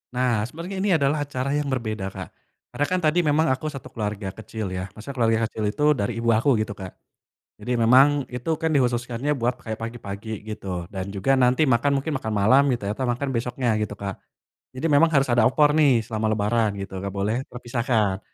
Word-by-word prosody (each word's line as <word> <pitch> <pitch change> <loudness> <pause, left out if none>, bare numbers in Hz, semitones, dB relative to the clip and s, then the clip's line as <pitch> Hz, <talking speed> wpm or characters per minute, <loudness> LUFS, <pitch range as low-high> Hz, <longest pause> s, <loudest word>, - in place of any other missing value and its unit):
Nah 125 -4 +1
sebenernya 170 - -6
ini 205 - +1
adalah 145 -2 +2
acara 140 0 -2
yang 145 -1 -1
berbeda 110 -6 -3
Kak, - - -8 0.5
karena 145 - +1
kan 185 - +2
tadi 165 +2 +2
memang 155 +2 +2
aku 135 +4 -1
1 135 -3 -8
keluarga 105 -2 -4
kecil 110 -1 -6
ya 90 +1 -5
maksudnya 110 +7 -9
keluarga 115 -3 +2
kecil 110 - -5
itu 145 +7 -3
dari 115 0 -2
ibu 115 -1 +3
aku 120 0 +3
gitu 110 -1 -3
Kak, 95 -2 -8 0.6
jadi 125 -1 -2
memang 135 +4 +5
itu 125 +5 -4
kan 160 - 0
dikhususkannya 125 +1 0
buat 125 -3 0
kayak 110 -1 -5
pagi-pagi 110 -2 -6
gitu 95 -5 -6
dan 95 -1 -4
juga 130 +8 +2
nanti 125 +4 +4
makan 135 +1 +2
mungkin 150 -3 -2
makan 110 -4 -3
malam 120 +8 +5
gitu 120 -5 -1
ya 100 - -1
atau 130 +4 -2
makan 125 +3 -1
besoknya 120 -2 -1
gitu 105 -1 -3
Kak, 100 -1 -6 0.6
jadi 145 +6 -1
memang 145 +3 +6
harus 135 0 +4
ada 120 - +4
opor 145 +3 +4
nih 140 -7 +4
selama 110 -1 -2
lebaran 110 +1 +1
gitu 95 -1 -7
gak 100 +1 -5
boleh 105 +4 0
terpisahkan, 120 -5 -1
120 Hz, 200 wpm, -24 LUFS, 110-140 Hz, 0.6 s, memang